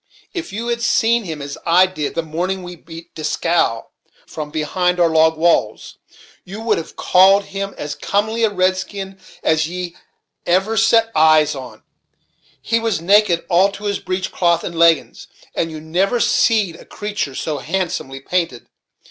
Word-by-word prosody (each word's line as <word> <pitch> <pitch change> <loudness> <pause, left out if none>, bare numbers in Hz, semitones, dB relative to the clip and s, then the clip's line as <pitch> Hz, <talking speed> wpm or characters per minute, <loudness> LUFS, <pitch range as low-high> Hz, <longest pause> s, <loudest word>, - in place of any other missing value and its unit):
If 345 -3 -5
you 225 +4 -4
had 235 0 -1
seen 235 -1 +2
him, 155 -4 -6
as 140 0 -7
I 175 +2 +5
did, 155 -6 -4
the 165 - -1
morning 180 +4 -3
we 180 0 -8
beat 165 0 -12
Dieskau, 155 -5 0 0.4
from 150 -2 -7
behind 180 +4 -1
our 170 -1 +4
log 160 0 +3
walls, 170 +1 0 0.4
you 195 +3 -9
would 225 -1 0
have 165 - -9
called 195 +2 +5
him 195 0 -5
as 145 0 -4
comely 210 +9 -1
a 220 - +4
redskin 190 0 -2 0.2
as 160 0 +2
ye 180 0 -6 0.5
ever 190 +5 +2
set 225 0 +3
eyes 155 -1 +5
on. 135 -2 -10 0.8
He 230 0 +1
was 225 -5 -1
naked 190 -1 +3
all 185 +3 +3
to 200 - -10
his 200 -1 -1
breech 185 +1 -3
cloth 170 -2 +1
and 170 - -5
leggins; 165 -3 +2 0.3
and 165 - -1
you 155 -1 -7
never 180 +9 0
seed 210 -8 +2
a - - -15
creatur' 205 -10 -4
so 150 0 -3
handsomely 135 -6 -3
painted. 165 -6 -2
180 Hz, 165 wpm, -19 LUFS, 160-200 Hz, 0.8 s, I